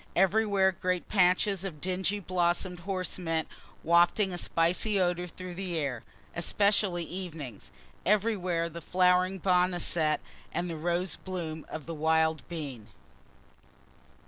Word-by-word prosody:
Everywhere 195 Hz, 0 st, +3 dB
great 180 Hz, -1 st, -2 dB
patches 190 Hz, 0 st, +3 dB
of 175 Hz, -6 st, -5 dB
dingy 190 Hz, +4 st, -1 dB
blossom'd 180 Hz, -1 st, 0 dB
horse 185 Hz, 0 st, -3 dB
mint 165 Hz, -2 st, -1 dB, 0.4 s
wafting 175 Hz, +4 st, +4 dB
a -, -, -3 dB
spicy 180 Hz, +6 st, +1 dB
odor 180 Hz, -1 st, +1 dB
through 185 Hz, +1 st, -8 dB
the 180 Hz, -2 st, -3 dB
air, 135 Hz, -6 st, -2 dB, 0.3 s
(especially 195 Hz, 0 st, +2 dB
evenings.) 165 Hz, -, -7 dB, 0.3 s
Everywhere 190 Hz, -5 st, +1 dB
the 170 Hz, 0 st, -8 dB
flowering 180 Hz, +2 st, +3 dB
boneset, 175 Hz, -4 st, +2 dB, 0.3 s
and 175 Hz, +1 st, -2 dB
the -, -, -4 dB
rose 175 Hz, +2 st, -1 dB
bloom 165 Hz, -4 st, -5 dB
of 155 Hz, -2 st, -6 dB
the 165 Hz, -, -5 dB
wild 160 Hz, 0 st, +2 dB
bean. 140 Hz, -10 st, -6 dB
180 Hz, 120 wpm, -29 LUFS, 165-190 Hz, 0.4 s, wafting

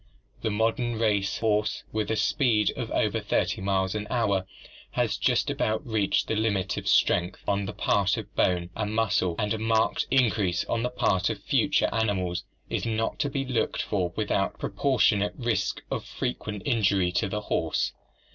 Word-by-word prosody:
The -, -, 0 dB
modern 115 Hz, +2 st, 0 dB
race 105 Hz, -3 st, +1 dB
horse 105 Hz, -1 st, 0 dB
with 110 Hz, -1 st, -2 dB
a 110 Hz, -, +1 dB
speed 110 Hz, -5 st, +2 dB
of -, -, -4 dB
over -, -, +1 dB
30 -, -, 0 dB
miles 95 Hz, -1 st, 0 dB
an 105 Hz, -1 st, -3 dB
hour 100 Hz, -6 st, +1 dB, 0.5 s
has -, -, +1 dB
just -, -, +1 dB
about 110 Hz, +6 st, -1 dB
reached 110 Hz, -5 st, +1 dB
the 110 Hz, -, 0 dB
limit 100 Hz, -4 st, 0 dB
of -, -, -5 dB
strength 90 Hz, +2 st, +2 dB
on 100 Hz, -1 st, +1 dB
the 105 Hz, -, -5 dB
part 100 Hz, -1 st, +1 dB
of -, -, -7 dB
bone 90 Hz, -1 st, +1 dB
and 110 Hz, 0 st, -2 dB
muscle, 100 Hz, -6 st, +1 dB
and 105 Hz, -1 st, 0 dB
a 110 Hz, -, -3 dB
marked 110 Hz, 0 st, +1 dB
increase 105 Hz, -8 st, +2 dB
on 115 Hz, -, -1 dB
the 125 Hz, -, 0 dB
part 95 Hz, -6 st, +1 dB
of -, -, -5 dB
future -, -, +2 dB
animals 95 Hz, -6 st, 0 dB, 0.2 s
is -, -, -2 dB
not 115 Hz, +4 st, -1 dB
to 145 Hz, -2 st, +1 dB
be 135 Hz, -1 st, -2 dB
looked 125 Hz, -2 st, -1 dB
for 90 Hz, -4 st, -1 dB
without 100 Hz, -2 st, 0 dB
proportionate 105 Hz, -2 st, +1 dB
risk 120 Hz, -3 st, -1 dB
of -, -, -2 dB
frequent 105 Hz, -5 st, -4 dB
injury 100 Hz, -5 st, +2 dB
to 95 Hz, +2 st, 0 dB
the 105 Hz, +2 st, -2 dB
horse. 80 Hz, -5 st, -1 dB
105 Hz, 175 wpm, -27 LUFS, 95-115 Hz, 0.5 s, speed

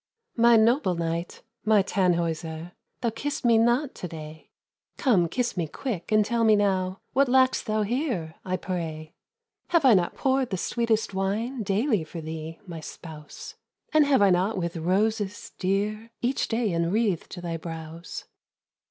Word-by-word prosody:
"My 235 Hz, 0 st, +6 dB
noble 225 Hz, -3 st, +3 dB
knight, 170 Hz, +1 st, -3 dB, 0.2 s
my 215 Hz, -2 st, +4 dB
Tannhäuser, 170 Hz, -3 st, -1 dB, 0.3 s
Thou'st 230 Hz, -2 st, 0 dB
kissed 290 Hz, -1 st, -3 dB
me 230 Hz, -2 st, +5 dB
not 240 Hz, +5 st, +2 dB
to 180 Hz, -, -6 dB
day. 155 Hz, -1 st, -10 dB, 0.5 s
Come, 190 Hz, -, +3 dB
kiss 245 Hz, +4 st, -1 dB
me 170 Hz, -4 st, -1 dB
quick, 205 Hz, -, -5 dB
and 215 Hz, -1 st, +4 dB
tell 235 Hz, +1 st, 0 dB
me 220 Hz, -1 st, +6 dB
now, 190 Hz, -2 st, 0 dB
What 275 Hz, +1 st, +4 dB
lack'st 260 Hz, 0 st, +3 dB
thou 215 Hz, 0 st, +1 dB
here, 230 Hz, -, -2 dB
I 185 Hz, 0 st, -1 dB
pray? 165 Hz, -4 st, -5 dB, 0.5 s
"Have 335 Hz, -4 st, +3 dB
I 255 Hz, -, +8 dB
not 180 Hz, -3 st, +2 dB
poured 265 Hz, -2 st, +1 dB
the 190 Hz, -, -2 dB
sweetest 225 Hz, +1 st, 0 dB
wine 215 Hz, +7 st, -1 dB
Daily 210 Hz, -, +1 dB
for 160 Hz, +2 st, -8 dB
thee, 160 Hz, 0 st, -6 dB
my 170 Hz, -3 st, -7 dB
spouse? 155 Hz, -1 st, -10 dB, 0.4 s
And 305 Hz, -2 st, +5 dB
have 270 Hz, -7 st, +4 dB
I 195 Hz, -, +5 dB
not 185 Hz, +4 st, +1 dB
with 170 Hz, -1 st, -2 dB
roses, 200 Hz, +4 st, 0 dB
dear, 210 Hz, +4 st, -1 dB
Each 250 Hz, +2 st, 0 dB
day 225 Hz, -3 st, 0 dB
enwreathed 175 Hz, +2 st, 0 dB
thy 170 Hz, -1 st, -3 dB
brows?" 165 Hz, 0 st, -7 dB
195 Hz, 155 wpm, -26 LUFS, 170-235 Hz, 0.5 s, I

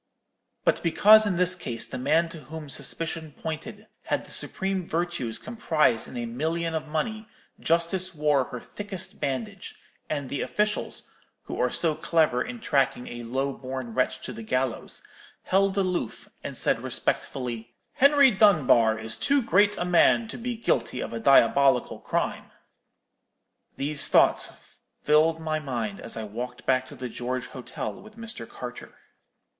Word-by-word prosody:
But -, -, +2 dB
because 210 Hz, +6 st, +6 dB
in 185 Hz, -4 st, 0 dB
this 180 Hz, 0 st, +4 dB
case 120 Hz, -11 st, -2 dB
the -, -, -6 dB
man 155 Hz, +6 st, +2 dB
to 160 Hz, -5 st, -10 dB
whom 155 Hz, +1 st, -8 dB
suspicion 160 Hz, +2 st, -2 dB
pointed 205 Hz, +7 st, -6 dB, 0.2 s
had -, -, -1 dB
the -, -, -10 dB
supreme 190 Hz, -2 st, -2 dB
virtues 165 Hz, -9 st, -2 dB
comprised 160 Hz, -, +1 dB
in 125 Hz, -, -8 dB
a 120 Hz, -, -2 dB
million 160 Hz, +8 st, -2 dB
of 155 Hz, -1 st, -3 dB
money, 215 Hz, +9 st, -3 dB, 0.3 s
Justice 170 Hz, +2 st, 0 dB
wore 150 Hz, -3 st, +2 dB
her 125 Hz, -, -7 dB
thickest 195 Hz, -, -6 dB
bandage, 130 Hz, -5 st, -4 dB, 0.3 s
and 145 Hz, -3 st, -2 dB
the 140 Hz, -, -3 dB
officials, 210 Hz, 0 st, -1 dB, 0.4 s
who -, -, -6 dB
are -, -, +2 dB
so 165 Hz, -2 st, +1 dB
clever 155 Hz, -5 st, +1 dB
in 245 Hz, -1 st, -7 dB
tracking 135 Hz, -, +1 dB
a 120 Hz, 0 st, -7 dB
low 135 Hz, +4 st, -2 dB
born 130 Hz, -3 st, -6 dB
wretch 130 Hz, +1 st, 0 dB
to 125 Hz, -, -5 dB
the 115 Hz, -, -8 dB
gallows, 130 Hz, +2 st, -2 dB, 0.4 s
held 195 Hz, +1 st, +2 dB
aloof, 180 Hz, -, -1 dB, 0.2 s
and -, -, -5 dB
said -, -, +1 dB
respectfully, 120 Hz, -3 st, -3 dB, 0.2 s
'Henry 280 Hz, -1 st, +6 dB
Dunbar 150 Hz, -, +4 dB
is 110 Hz, 0 st, -3 dB
too 280 Hz, -2 st, +2 dB
great 205 Hz, -1 st, +3 dB
a 175 Hz, -, -1 dB
man 180 Hz, +6 st, +4 dB
to -, -, -6 dB
be 240 Hz, 0 st, -3 dB
guilty 125 Hz, -, 0 dB
of -, -, -4 dB
a 115 Hz, -, -3 dB
diabolical 135 Hz, +1 st, +4 dB
crime.' -, -, -2 dB, 1.3 s
"These 145 Hz, +1 st, +2 dB
thoughts -, -, +2 dB, 0.2 s
filled 155 Hz, +2 st, +4 dB
my 155 Hz, -1 st, -1 dB
mind 120 Hz, -8 st, -4 dB
as -, -, -1 dB
I 110 Hz, -, -3 dB
walked 120 Hz, +4 st, -6 dB
back 130 Hz, 0 st, +2 dB
to -, -, -11 dB
the 125 Hz, -, -5 dB
George 125 Hz, +1 st, -4 dB
Hotel 120 Hz, -4 st, -6 dB
with 215 Hz, +1 st, -15 dB
Mr. 225 Hz, -, -7 dB
Carter. 125 Hz, 0 st, -9 dB
150 Hz, 155 wpm, -26 LUFS, 125-185 Hz, 1.3 s, because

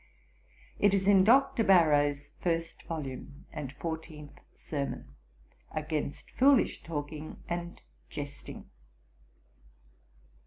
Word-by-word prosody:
It 205 Hz, -1 st, +5 dB
is 195 Hz, 0 st, 0 dB
in 195 Hz, -2 st, +7 dB
Dr. 255 Hz, +2 st, +5 dB
Barrow's 145 Hz, -7 st, +4 dB
first 165 Hz, -1 st, -1 dB
volume, 140 Hz, -3 st, -6 dB
and 150 Hz, -5 st, -5 dB
fourteenth 155 Hz, -1 st, -6 dB, 0.2 s
sermon, 140 Hz, -, -4 dB, 0.7 s
_'Against 155 Hz, -2 st, -2 dB, 0.2 s
foolish 270 Hz, -1 st, +5 dB
Talking 155 Hz, -1 st, -6 dB
and 175 Hz, 0 st, -4 dB, 0.3 s
Jesting.' 145 Hz, -1 st, -7 dB
160 Hz, 85 wpm, -30 LUFS, 145-185 Hz, 0.7 s, in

